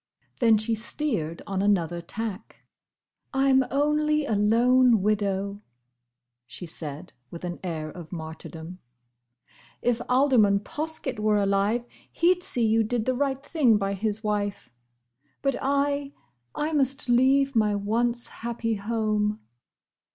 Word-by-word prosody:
Then 230 -3 +5
she 215 +2 -1
steered 220 - -1
on 195 -1 -2
another 175 -4 +1
tack. 215 +3 -7 0.7
"I 270 0 +3
'm 265 0 +5
only 300 +2 +1
a 225 - -1
lone 230 +2 +4
widow," 200 -1 -1 0.9
she 175 - -8
said, 160 0 -8 0.2
with 170 - -9
an 175 -1 -4
air 160 -4 -3
of 170 -2 -10
martyrdom. 160 +1 -8 1.0
"If 240 -1 0
Alderman 250 -7 +4
Poskett 300 -2 -4
were 210 0 +2
alive, 200 +4 +1 0.3
he 345 +2 +4
'd 360 - -12
see 245 -9 0
you 225 +1 +3
did 220 0 -1
the 255 - +1
right 275 +1 -1
thing 275 -9 +3
by 195 -1 -1
his 210 +2 -2
wife. 205 - -2 0.7
But 275 -1 +1
I!—I 280 - -2
must 270 -3 0
leave 265 +3 +3
my 210 -2 +3
once 235 +4 0
happy 230 -1 -3
home!" 215 0 -1
220 Hz, 130 wpm, -26 LUFS, 200-265 Hz, 1.0 s, Then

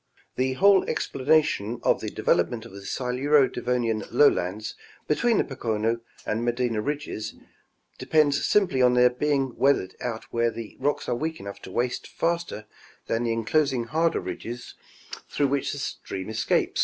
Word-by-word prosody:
The 130 +1 +1
whole 195 +6 +5
explanation 130 -6 +1
of - - +2
the - - -3
development 115 -2 0
of 115 - -11
the 100 +1 -10
Siluro 135 +3 +2
Devonian 115 -4 -1
lowlands 110 -5 +2 0.3
between 225 +9 +2
the - - +3
Pocono 115 -3 -1 0.3
and 110 +2 -1
Medina 120 -2 0
ridges 145 -5 -4 0.6
depends 150 -2 +2
simply 185 -11 +2
on 125 0 +5
their 125 0 +6
being 135 -1 0
weathered 135 -9 +2
out 115 -2 -3
where 115 0 +2
the 115 -1 -8
rocks 145 +2 -1
are - - +1
weak 160 +6 -3
enough 100 0 -8
to - - -10
waste 120 +4 -1
faster 170 -10 -2 0.4
than 115 +1 -1
the 115 - 0
enclosing 125 +3 +1
harder 160 +8 +1
ridges 120 +2 -6 0.6
through 140 -2 +1
which 140 0 0
the - - -5
streams 110 -6 -5
escape. 110 - +1
125 Hz, 155 wpm, -26 LUFS, 115-145 Hz, 0.6 s, their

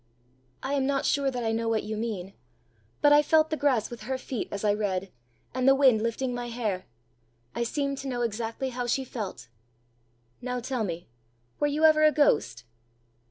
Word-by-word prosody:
"I 270 - -2
am 270 -2 +1
not 275 -1 0
sure 280 -1 +2
that 250 -2 -3
I 225 - 0
know 225 0 -1
what 225 -1 +1
you 215 +1 -4
mean; 210 -4 -4 0.7
but 290 0 +7
I 295 - +7
felt 315 +1 +3
the - - +1
grass 265 -8 +1
with 240 - -8
her 265 - 0
feet 260 -2 -4
as 200 - -5
I 205 -1 +3
read, 195 -3 -2 0.4
and 255 +1 0
the 270 - +7
wind 260 -6 +5
lifting 240 +3 -1
my 245 0 -4
hair. 215 -6 -3 0.7
I - - -3
seemed 275 +3 -1
to 275 - -6
know 245 -2 -1
exactly 230 +3 -2
how 245 -1 -4
she 265 +3 +1
felt!" 195 - -6 0.9
"Now 250 0 -3
tell 245 -1 -2
me, 175 -3 -4 0.5
were 295 - +2
you 295 +2 -1
ever 310 -1 +6
a 305 - +7
ghost?" 145 - +2
245 Hz, 195 wpm, -27 LUFS, 215-275 Hz, 0.9 s, but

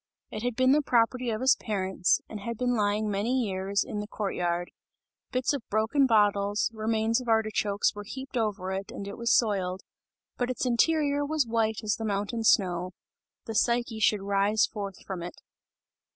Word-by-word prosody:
It 215 - -5
had 245 0 -2
been 255 +1 +4
the 300 +2 +4
property 245 -1 +1
of 220 0 -2
his 260 +1 +5
parents, 190 -4 0
and 215 - -7
had 230 +2 -5
been 245 +1 0
lying 210 0 +1
many 210 +6 0
years, 195 0 -1
in 210 - -5
the 210 - -5
court 210 -2 -3
yard; 175 0 -2 0.6
bits 255 +3 +1
of 280 - -2
broken 220 +6 +2
bottles, 205 -2 +2
remains 220 +2 0
of 250 - -10
artichokes 215 -2 +1
were 205 -1 -7
heaped 265 +6 -8
over 205 -5 -1
it 195 +1 -4
and 200 - -7
it 200 - -6
was 235 0 -1
soiled, 190 -6 0 0.6
but 245 0 -1
its 255 - -2
interior 290 +3 +2
was 300 -1 +1
white 225 -1 0
as 210 -1 0
the 225 - -5
mountain 205 +3 -2
snow; 180 -4 +2 0.5
the 225 - -5
Psyche 235 0 +1
should 210 -2 +2
rise 200 +2 +2
forth 200 -3 -7
from 190 -3 -5
it. 175 +1 -8
215 Hz, 180 wpm, -28 LUFS, 200-240 Hz, 0.6 s, his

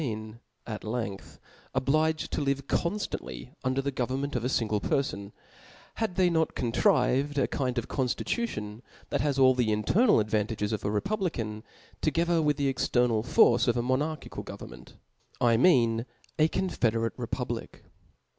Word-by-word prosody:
een, 110 -4 -5 0.3
at 110 -2 -6
length, 110 -3 -5 0.4
obliged 155 +4 +1
to - - -1
live 140 -1 0
conftandy 140 - -3
us. 130 0 0
dc*r 135 - +1
the 140 - -1
government 130 +2 -2
of 120 - -1
a 125 - 0
fingle 110 -5 0
perfon, 105 -7 -1 0.7
had 220 -5 -1
they 185 -1 +4
not 160 -2 +1
contrived 130 +4 +2
a 135 - +2
kind 130 -3 -2
of 120 - -1
coniiicution 125 - -2 0.3
that - - 0
has 145 -2 0
all 130 -1 +6
the 125 -4 +1
internal 175 - +3
advantages 105 0 -1
of 110 - -3
a 100 - 0
republican, 115 - -2 0.4
'together 165 +1 +2
with 150 -2 +1
the 140 -1 +1
external 125 -3 +1
force 120 +1 +4
of 120 0 +2
a 120 - 0
monarchical, 145 +5 -2
govern - - -9
ment, - - -14 0.4
I 120 -1 +4
mean 115 -5 +3 0.3
a 155 - +6
confederate 115 - 0
republic. - - -5
130 Hz, 155 wpm, -28 LUFS, 115-150 Hz, 0.7 s, all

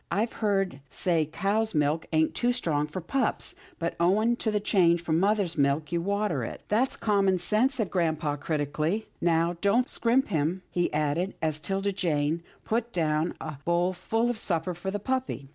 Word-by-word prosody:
I've 215 +6 0
heard 195 -7 0
say 165 -4 +1
cow's 215 +2 0
milk 150 +2 +1
ain't 160 -1 +2
too 245 0 +1
strong 155 -11 0
for 165 +5 -5
pups, 245 +7 -1 0.2
but, 170 0 -2
owing 210 +7 +3
to 225 - -1
the 210 -1 +1
change 175 -5 +3
from 160 -1 +1
mother's 195 -4 +1
milk, 140 +2 +1
you 170 -1 0
water 200 +3 0
it." - - -6
" - - -40
That's 235 +5 +1
common 200 -3 +2
sense," 215 +9 +1
said 220 -7 -2
grampa 160 -4 0
critically. 155 +7 -1
" - - -38
Now 165 +1 +1
don't 230 +5 +3
scrimp 245 +3 +1
him," 165 +4 0
he 175 0 0
added, 155 +5 0
as 155 -1 -1
'Tilda 195 +4 -1
Jane 160 -3 0 0.2
put 235 +1 -1
down 155 -2 0
a 155 -3 -6
bowl 175 +2 +1
full 225 +6 0
of 230 - -5
supper 170 -2 -1
for 175 +3 -5
the 200 - -1
puppy. 250 - -3
180 Hz, 185 wpm, -27 LUFS, 160-210 Hz, 0.2 s, owing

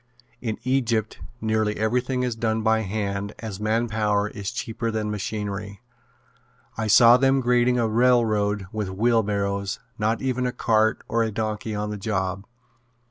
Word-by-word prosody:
In 110 -3 -3
Egypt 120 -4 0 0.2
nearly 110 -1 0
everything 125 +4 0
is 125 -2 -1
done 110 -1 -1
by 110 0 +3
hand 100 -1 -3
as 105 -4 -6
man 110 +3 0
power 105 -2 0
is 100 -2 -5
cheaper 115 0 -3
than 110 -1 -2
machinery. 105 -1 -4 1.0
I 110 0 -2
saw 115 +3 +7
them 135 +1 +3
grading 125 0 +2
a 115 -2 +2
railroad 110 -4 +2
with 105 -3 -3
wheelbarrows, 100 -2 0 0.2
not 110 +2 +1
even 125 -1 -1
a - - -1
cart 110 -3 +1
or 115 +1 +1
a 115 - +1
donkey 110 0 -3
on 105 0 -3
the 105 - -4
job. 95 -2 -2
110 Hz, 150 wpm, -24 LUFS, 105-115 Hz, 1.0 s, saw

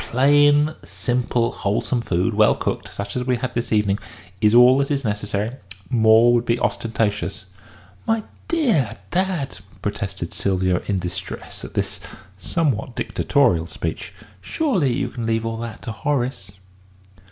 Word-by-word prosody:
Plain, 145 +5 +4
simple, 120 -1 -1
wholesome 110 +4 -1
food, 95 +1 0
well 105 +1 +4
cooked, - - -3
such 100 0 -5
as 125 - -1
we 125 0 +1
have 115 - -7
had 130 - -2
this 120 0 -2
evening, 105 -2 +2 0.4
is 105 +1 +4
all 125 +2 +7
that 140 - 0
is 140 -2 0
necessary. 105 +3 -2 0.3
More 115 0 +6
would 120 -1 +3
be 120 0 0
ostentatious." 110 -2 -1 0.6
"My 225 -1 +1 0.2
dear 230 - +1
dad!" 175 - -1 0.2
protested 100 -4 -4
Sylvia, 95 -2 +1
in 100 - 0
distress 95 +1 -6
at - - -9
this - - -1 0.4
somewhat 130 - -1
dictatorial 90 - +1
speech. 80 -1 -5 0.3
"Surely 185 - 0
you 120 - -1
can 115 -2 -5
leave 115 0 0
all 115 0 -3
that 115 -1 -7
to 115 - -4
Horace!" 120 -6 -2
115 Hz, 145 wpm, -22 LUFS, 105-135 Hz, 0.6 s, all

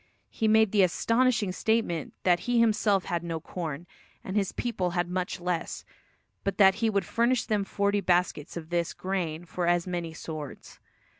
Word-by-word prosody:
He 220 - 0
made 220 -1 +5
the 205 - +4
astonishing 225 +3 +2
statement 200 -5 -1
that 175 -1 +4
he 245 -1 +3
himself 210 -4 +3
had 170 -2 -2
no 165 -1 -3
corn, 165 -2 -5 0.4
and 190 - -5
his 200 -3 +1
people 195 -7 -2
had 175 0 +1
much 180 0 -3
less; 175 -1 -3 0.6
but 195 - -2
that 190 -2 +7
he 225 - +3
would 200 -4 0
furnish 235 +4 +1
them 210 -3 0
forty 200 +1 0
baskets 175 -4 0
of 165 0 -8
this 170 -1 0
grain 175 -3 -3
for 175 0 -3
as 175 0 +2
many 175 -2 -3
swords. 155 -3 -8
185 Hz, 170 wpm, -28 LUFS, 170-210 Hz, 0.6 s, that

